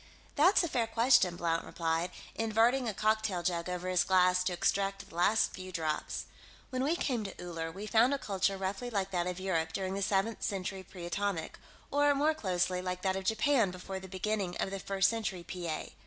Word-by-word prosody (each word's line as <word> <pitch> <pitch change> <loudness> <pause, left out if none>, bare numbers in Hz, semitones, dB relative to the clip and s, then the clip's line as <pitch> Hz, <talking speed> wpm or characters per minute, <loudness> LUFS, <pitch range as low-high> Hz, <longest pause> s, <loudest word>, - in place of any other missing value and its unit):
"That's 355 +6 +5
a - - +1
fair 235 -7 0
question," 225 -6 +4
Blount 165 -1 0
replied, 165 +1 -1 0.2
inverting 225 +3 +2
a - - -3
cocktail 215 -4 +1
jug 170 0 -1
over 180 0 -3
his 180 -1 +3
glass 180 0 +4
to 185 - +1
extract 195 +2 0
the - - -17
last 205 +6 +3
few 185 0 -7
drops. 155 -3 -2 0.5
"When 255 0 -1
we 305 +5 +2
came 250 -9 -1
to 195 - -8
Uller, 165 -2 -4
we 195 +5 -7
found 230 +4 +4
a 280 - +1
culture 195 -4 0
roughly 195 +5 -3
like 195 -4 -1
that 175 -1 0
of 180 0 -3
Europe 165 -4 -1
during 190 +1 -2
the 200 - -2
Seventh 200 +3 0
Century 190 -1 -3
Pre 180 -1 -10
Atomic, 185 -2 -2 0.3
or, 290 0 +4
more 300 +3 +3
closely, 180 - 0
like 180 0 -4
that 190 -1 +1
of 190 0 -4
Japan 230 0 +3
before 185 +1 -6
the 190 - -10
beginning 190 -1 -2
of 195 - -2
the 195 - -3
First 195 0 +2
Century 200 -5 -2
P. 175 0 -6
A. 155 - -4
190 Hz, 205 wpm, -32 LUFS, 180-220 Hz, 0.5 s, That's